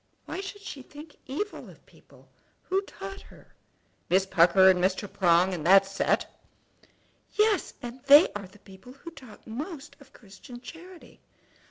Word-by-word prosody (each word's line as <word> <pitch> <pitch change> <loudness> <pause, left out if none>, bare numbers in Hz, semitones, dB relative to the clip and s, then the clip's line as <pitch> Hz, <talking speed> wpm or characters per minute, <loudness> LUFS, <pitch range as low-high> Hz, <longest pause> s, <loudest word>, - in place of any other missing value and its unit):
"Why - - -5
should 400 +1 -9
she 285 -9 -8
think 295 +4 -13
evil 370 +11 -5
of - - -18
people? - - -22 0.4
Who 380 +1 -1
taught 390 0 -9
her?" - - -19 0.6
"Miss 190 +2 +3
Pucker, 190 0 +5
and 180 -1 +4
Mr. 190 +2 0
Prong, 180 -1 +2
and 165 -4 -5
that 195 +1 +7
set." 195 0 0 1.1
"Yes; 425 -2 +1
and 245 +2 -8
they 290 +4 +8
are 200 -2 -7
the 190 +3 -20
people 195 +5 -15
who 335 +5 -12
talk 255 -9 -15
most 285 - -8
of 280 -2 -19
Christian 215 +3 -14
charity!" 340 +6 -14
245 Hz, 155 wpm, -27 LUFS, -, 1.1 s, they